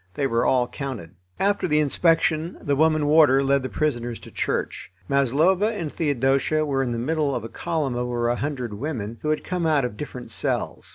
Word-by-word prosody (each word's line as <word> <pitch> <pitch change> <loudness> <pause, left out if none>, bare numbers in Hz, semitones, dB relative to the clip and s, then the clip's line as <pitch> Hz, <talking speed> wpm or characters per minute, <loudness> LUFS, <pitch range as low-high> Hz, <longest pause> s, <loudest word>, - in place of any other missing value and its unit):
They 140 - 0
were 115 -3 +1
all 125 -2 +2
counted. 125 - -6 0.3
After 200 -1 +1
the 150 -2 +2
inspection 165 +2 +1
the 145 - 0
woman 155 0 +3
warder 145 -3 +5
led 140 0 +2
the 130 - -4
prisoners 120 -6 -2
to - - -12
church. - - -3 0.2
Maslova 155 - +2
and 165 -8 -4
Theodosia 145 +1 +1
were 135 -2 0
in 125 -2 -1
the 120 - -2
middle 145 +2 0
of 115 - -3
a - - -5
column 155 -4 -2
of 125 0 -2
over 120 -1 -1
a 120 - +1
hundred 130 -4 -3
women, 115 -2 -5
who 150 - -2
had 155 - 0
come 180 -2 -1
out 145 -4 +2
of 105 -4 -5
different 125 -4 -7
cells. - - -2
140 Hz, 205 wpm, -24 LUFS, 125-155 Hz, 0.3 s, warder